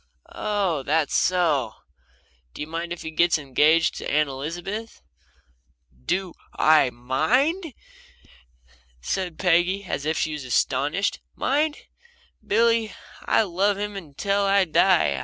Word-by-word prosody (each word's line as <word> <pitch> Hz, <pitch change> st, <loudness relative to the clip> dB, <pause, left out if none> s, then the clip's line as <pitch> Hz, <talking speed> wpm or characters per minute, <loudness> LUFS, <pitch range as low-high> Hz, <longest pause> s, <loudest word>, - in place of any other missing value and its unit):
"Oh 200 Hz, -8 st, -1 dB
that's 150 Hz, +2 st, 0 dB
so! 155 Hz, -11 st, +1 dB, 0.8 s
Do -, -, -7 dB
you -, -, -2 dB
mind 165 Hz, +2 st, -5 dB
if 175 Hz, -, -6 dB
he 160 Hz, -, -5 dB
gets 170 Hz, +2 st, +3 dB
engaged 155 Hz, +3 st, +2 dB
to -, -, -5 dB
Aunt 150 Hz, -1 st, +2 dB
Elizabeth?" 175 Hz, +11 st, -6 dB, 1.0 s
"Do 185 Hz, -2 st, -1 dB, 0.2 s
I 155 Hz, -4 st, +5 dB
MIND?" 245 Hz, -, 0 dB, 1.2 s
said 175 Hz, -, -3 dB
Peggy, 180 Hz, +2 st, +2 dB
as 175 Hz, -, -4 dB
if 160 Hz, 0 st, 0 dB
she 155 Hz, -, -1 dB
was 150 Hz, -2 st, -6 dB
astonished. 145 Hz, +8 st, 0 dB, 0.2 s
"Mind? 295 Hz, +3 st, 0 dB, 0.7 s
Billy, 230 Hz, 0 st, +2 dB, 0.3 s
I'll 210 Hz, -5 st, +2 dB
love 200 Hz, +2 st, +2 dB
him 200 Hz, -8 st, -6 dB
till 200 Hz, +3 st, 0 dB
I 200 Hz, -1 st, +3 dB
die. 165 Hz, -, +3 dB
175 Hz, 120 wpm, -24 LUFS, 150-200 Hz, 1.2 s, I